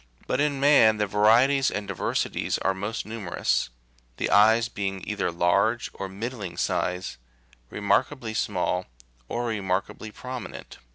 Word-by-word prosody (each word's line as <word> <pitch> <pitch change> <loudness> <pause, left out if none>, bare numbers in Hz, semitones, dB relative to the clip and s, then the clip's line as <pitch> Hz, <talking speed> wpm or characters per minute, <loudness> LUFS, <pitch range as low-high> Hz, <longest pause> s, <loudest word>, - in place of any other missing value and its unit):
But 130 - -1
in 145 -2 +1
man 135 -6 +6
the 105 - +1
varieties 115 +7 +4
and 105 -1 -4
diversities 100 -4 -1
are 95 - 0
most 105 +4 -4
numerous; 105 - -1 0.5
the - - -1
eyes 110 +3 +5
being 95 -3 -4
either 105 -4 -1
large, 100 +7 +1
of 95 - -6
middling 105 -1 -6
size, 90 -6 -2 0.5
re - - -7
markably 120 +1 0
small, 90 -3 -1 0.4
or 120 +1 -2
remarkably 100 -1 -2
prominent. 125 +3 -8
105 Hz, 130 wpm, -26 LUFS, 95-120 Hz, 0.5 s, man